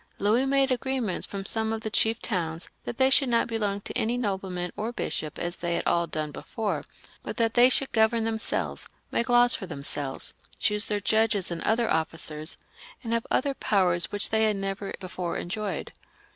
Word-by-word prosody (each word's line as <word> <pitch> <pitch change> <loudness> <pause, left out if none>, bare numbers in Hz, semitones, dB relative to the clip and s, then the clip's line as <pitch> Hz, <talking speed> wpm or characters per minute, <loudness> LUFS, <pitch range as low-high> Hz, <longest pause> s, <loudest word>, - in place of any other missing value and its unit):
Louis 225 +6 +2
made 275 0 +3
agreements 255 -6 -1
with 195 -1 -4
some 220 -1 0
of 225 0 -2
the 220 - -3
chief 225 +2 +3
towns 170 -5 -2 0.2
that 235 - -4
they 265 0 +4
should 270 0 +5
not 235 -1 +3
belong 210 -3 -1
to - - -7
any 235 +3 +1
nobleman 190 -5 -2
or 220 +3 -2
bishop 155 -9 -2
as 175 0 -3
they 170 0 -1
had - - -2
all 170 0 +2
done 155 -2 -3
before, 215 +7 -3 0.4
but - - -6
that 230 -2 +2
they 245 +1 +7
should 265 +1 +1
govern 220 0 +3
themselves, 225 0 -2 0.2
make 235 +2 0
laws 245 0 +6
for 190 - -4
themselves, 140 -3 -3 0.2
choose 210 +1 +1
their 210 -1 -1
judges 215 -3 +2
and 170 - -3
other 230 +1 +2
oflScers, 160 -1 -2 0.5
and 230 -1 -2
have 230 0 0
other 280 +1 +1
powers 180 -8 +1
which 205 0 -1
they 220 0 +4
had 215 -1 +2
never 195 0 -3
before 180 -2 -4
enjoyed. 195 -1 -4
210 Hz, 185 wpm, -27 LUFS, 180-230 Hz, 0.5 s, they